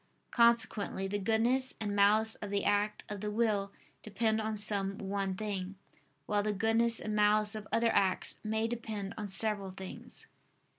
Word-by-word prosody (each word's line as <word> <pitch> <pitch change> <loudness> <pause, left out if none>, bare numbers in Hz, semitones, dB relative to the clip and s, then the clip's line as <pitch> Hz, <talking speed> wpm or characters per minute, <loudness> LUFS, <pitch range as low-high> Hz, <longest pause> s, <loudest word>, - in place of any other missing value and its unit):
Consequently 230 -4 +2
the 205 +1 -2
goodness 235 +6 +2
and 205 -2 -3
malice 215 +2 +4
of 205 - -7
the 200 0 -1
act 205 +1 0
of 205 -2 -6
the 210 - -3
will 210 -2 0 0.3
depend 220 +1 0
on 215 0 -3
some 200 -1 0
one 195 -1 -3
thing; 195 -2 -4 0.5
while 205 +4 +1
the 210 +1 -1
goodness 225 +3 +3
and 215 -1 -4
malice 210 0 +3
of 215 -1 -6
other 230 0 +2
acts 190 -2 +1
may 220 +1 -1
depend 220 -4 -5
on 210 -1 -5
several 200 0 +1
things. 190 0 -10
210 Hz, 160 wpm, -31 LUFS, 200-220 Hz, 0.5 s, malice